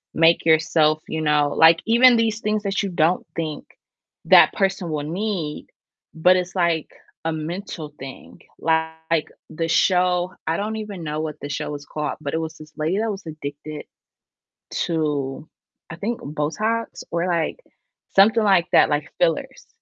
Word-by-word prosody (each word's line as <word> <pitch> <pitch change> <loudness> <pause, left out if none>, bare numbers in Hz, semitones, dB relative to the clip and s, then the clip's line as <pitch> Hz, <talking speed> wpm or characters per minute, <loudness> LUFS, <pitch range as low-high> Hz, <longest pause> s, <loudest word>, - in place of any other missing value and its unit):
make 165 +1 +4
yourself, 155 -1 +3
you 160 0 -3
know 150 -1 +2
like, 165 +1 +6
even 240 +1 +6
these 225 -1 +1
things 215 0 -1
that 195 0 -1
you 195 - -2
don't 170 +1 +1
think 155 -3 -4 0.6
that - - +7
person 190 -3 -1
will 150 -2 -2
need, 170 -2 -3 0.5
but 180 +3 +4
it's 180 0 -2
like 170 -3 +1 0.4
a 165 - +1
mental 160 -1 -6
thing, 135 0 -10 0.2
like, 160 0 0 0.2
the 165 +1 -2
show 180 +1 +2
I 160 +1 +1
don't 215 +2 -3
even 205 -5 -6
know 150 0 -3
what 155 -1 -4
the 145 - -6
show 145 +1 -3
is 145 0 -9
called, 150 -1 -4
but 145 0 -4
it - - +1
was 160 0 -6
this 155 0 -14
lady 160 +5 0
that 225 -1 0
was 195 -2 -8
addicted 150 0 -7 1.0
to 150 -3 -2 0.4
I - - -6
think 230 +6 -3
Botox 190 +11 -2
or, 170 +2 0
like, 175 - -1 0.5
something 220 +3 +5
like 190 -4 +4
that, - - +6
like 150 0 -1
fillers. 165 -3 0
165 Hz, 160 wpm, -22 LUFS, 155-195 Hz, 1.0 s, that